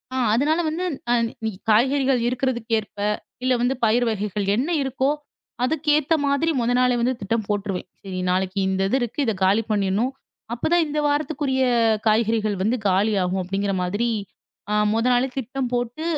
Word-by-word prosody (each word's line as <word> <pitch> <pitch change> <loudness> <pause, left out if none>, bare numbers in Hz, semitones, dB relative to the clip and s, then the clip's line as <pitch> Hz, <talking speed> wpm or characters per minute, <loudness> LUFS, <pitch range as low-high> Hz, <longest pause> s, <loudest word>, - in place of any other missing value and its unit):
ஆ - - -1 0.2
அதனால 300 +7 +2
வந்து 320 +4 -2
ந 245 -4 -2 0.3
இ - - +1 0.2
காய்கறிகள் 265 +4 +3
இருக்கிறதுக்கேற்ப, 240 -4 -1 0.5
இல்ல 255 0 +3
வந்து 245 +2 +2
பயிரு 235 +2 +3
வகைகள் 210 -2 -2
என்ன 260 +9 -1
இருக்கோ, 265 0 0 0.5
அதுக்கேத்த 300 +2 +2
மாதிரி 280 +4 +1
முதல் 245 +1 +1
நாளே 250 -1 +3
வந்து 250 +2 +2
திட்டம் 220 +2 -1
போட்டுருவேன். 200 -3 -2 0.2
"சரி 190 -2 -5
நாளைக்கு 185 +1 0
இந்த 190 0 0
இது 260 - +2
இருக்கு 240 +3 -4
இதை 225 - +1
காலி 205 +4 +3
பண்ணிடணும். 205 +4 +1 0.4
அப்போதான் 335 +8 +2
இந்த 300 +1 -2
வாரத்துக்குரிய 290 -2 0 0.5
காய்கறிகள் 215 -1 +2
வந்து 230 +5 +1
காலியாகும்." 190 -1 +1
அப்படிங்கிற 195 +2 -2
மாதிரி 205 +7 -1 0.8
முதல் 230 +3 +2
நாளே 245 +2 +2
திட்டம் 260 0 -3
போட்டு, 245 +5 -2
240 Hz, 150 wpm, -23 LUFS, 205-265 Hz, 0.8 s, காய்கறிகள்